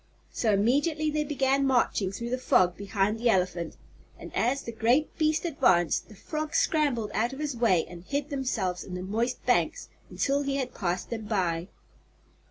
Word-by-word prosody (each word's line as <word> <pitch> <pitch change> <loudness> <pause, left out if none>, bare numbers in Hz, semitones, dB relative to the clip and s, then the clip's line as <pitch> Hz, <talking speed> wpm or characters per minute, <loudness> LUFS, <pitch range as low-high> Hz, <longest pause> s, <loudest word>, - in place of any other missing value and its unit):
So 225 - +1
immediately 290 +9 +2
they 305 0 0
began 275 -1 +1
marching 235 -7 +2
through 235 +4 -5
the 255 - -1
fog 180 -7 +3
behind 200 +2 -1
the 240 +1 +2
elephant, 180 -4 0 0.4
and - - -10
as 255 +4 +1
the 235 - -5
great 235 +7 +1
beast 310 +1 +2
advanced 220 - +2
the 215 - -13
frogs 305 +8 -3
scrambled 275 -9 +1
out 235 +4 0
of 270 - -8
his 295 -3 -2
way 225 -8 +3
and 175 -1 -11
hid 285 +7 -3
themselves 215 -10 -2
in 180 - -7
the 180 - -5
moist 225 +6 -2
banks - - +1 0.2
until 280 +1 0
he 275 -1 -1
had 260 -2 -2
passed 180 0 -3
them 225 -2 -4
by. 180 -5 -1
235 Hz, 175 wpm, -28 LUFS, 190-280 Hz, 0.4 s, fog